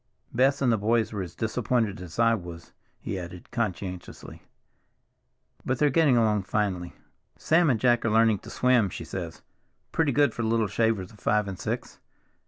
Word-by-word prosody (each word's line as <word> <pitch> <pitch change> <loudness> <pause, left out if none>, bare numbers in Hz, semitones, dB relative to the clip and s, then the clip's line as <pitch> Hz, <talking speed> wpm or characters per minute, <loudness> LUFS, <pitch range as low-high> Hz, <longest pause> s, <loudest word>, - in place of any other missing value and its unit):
Bess 135 +3 +2
and 125 - +3
the 110 - +1
boys 110 +2 +1
were 100 - -3
as 90 -2 -7
disappointed 110 -2 -1
as 85 -3 -9
I 115 0 +4
was," 85 -5 -7 0.3
he 95 - -4
added 90 0 -10
conscientiously. 95 -6 -5 1.2
"But 130 - -1
they're 145 +2 +3
getting 145 -4 +4
along 110 -3 +2
finely. 95 -5 -2 0.4
Sam 165 0 +3
and 120 -4 +2
Jack 120 0 +3
are 115 - +1
learning 110 -1 +3
to - - -12
swim, 125 -5 +2
she - - -7
says—pretty 160 -3 -5
good 145 -3 +3
for - - -4
little 115 0 +1
shavers 110 -2 0
of 105 - -18
five 105 -1 +1
and 95 -2 -6
six! - - -4
110 Hz, 170 wpm, -26 LUFS, 95-120 Hz, 1.2 s, I